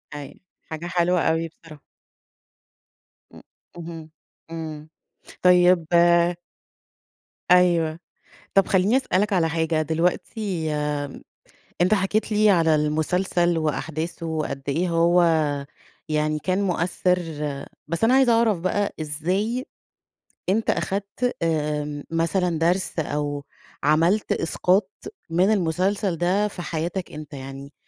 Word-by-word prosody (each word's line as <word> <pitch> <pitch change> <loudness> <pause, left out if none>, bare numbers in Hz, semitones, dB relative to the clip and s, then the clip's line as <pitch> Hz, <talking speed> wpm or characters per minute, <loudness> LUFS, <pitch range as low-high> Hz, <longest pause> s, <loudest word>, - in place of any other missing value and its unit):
أيوه. 145 -2 -9 0.3
حاجة 160 +2 -6
حلوة 175 0 +1
أوي 165 +1 +1
بصراحة. 155 -2 -15 1.5
إمم، - - -14 0.3
اهم. 165 -2 -8 0.4
إمم. 155 -2 -7 0.5
طيب 180 -2 +5 1.7
أيوه. 170 -3 +4 0.6
طب 195 -1 +5
خلّيني 195 +6 +3
أسألك 210 -5 +1
على 165 -3 +2
حاجة، 160 -1 0
دلوقتي 170 +2 -1 0.4
م - - -11 0.6
أنت 185 +4 +4
حكيت 210 +3 0
لي 210 0 +4
على 165 -4 +4
المسلسل 170 +3 +1
وأحداثه، 160 +2 -3
وقد 155 -4 -3
إيه 170 +6 0
هو 170 +1 +3 0.9
يعني 155 0 0
كان 185 +5 -1
مؤثّر، 180 0 +1 0.7
بس 170 +7 0
أنا 240 +3 +4
عايزة 265 -3 +5
أعرف 225 -5 +3
بقى، 200 +3 -1
إزاي 185 - -1 0.8
أنت 220 +3 +1
أخدت 200 +6 -1
آمم 150 -2 -1
مثلًا 165 0 0
درس 175 +1 +1
أو 145 -1 -3 0.4
عملت 165 +8 +2
إسقاط 185 +4 +1 0.4
من 180 +5 +3
المسلسل 190 0 0
ده 185 +5 +1
في 190 -3 -8
حياتك 175 +3 -4
أنت؟ 150 -1 -9
يعني 135 +1 -8
170 Hz, 110 wpm, -23 LUFS, 155-190 Hz, 1.7 s, طيب